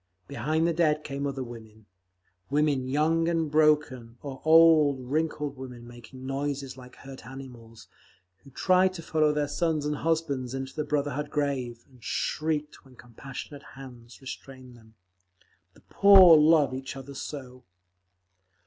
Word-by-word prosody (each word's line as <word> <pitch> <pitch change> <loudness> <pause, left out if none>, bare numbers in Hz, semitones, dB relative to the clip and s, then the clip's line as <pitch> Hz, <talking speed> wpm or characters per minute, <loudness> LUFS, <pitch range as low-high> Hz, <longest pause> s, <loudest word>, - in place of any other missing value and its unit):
Behind 155 +7 -1
the 170 - +1
dead 155 -2 +1
came 140 0 -4
other 135 -1 -4
women—women 110 - -5
young 160 +4 +1
and 165 -3 -1
broken, 150 -6 +1
or 135 -2 -8
old, 155 -3 +5
wrinkled 150 -2 -2
women 125 -2 -10
making 120 +2 -12
noises 135 0 -4
like 125 -1 -14
hurt 135 -1 -12
animals, 120 -4 -12 0.5
who 140 - -18
tried 185 +7 +2
to 165 - -8
follow 155 -1 +1
their 150 -1 -1
sons 155 0 -1
and 150 0 -2
husbands 145 -6 -2
into 135 0 -6
the 150 - -2
Brotherhood 145 0 -2
Grave, 130 -5 -3
and 130 -4 -22
shrieked 150 -1 -3
when 130 -2 -19
compassionate 130 +4 -10 0.2
hands 125 -3 -12
restrained 130 -1 -10
them. 110 -1 -20 0.8
The - - -21
poor 190 -4 +7
love 150 -3 +4
each 130 0 -6
other 135 +1 -9
so! 130 -3 -8
140 Hz, 140 wpm, -27 LUFS, 125-150 Hz, 0.8 s, poor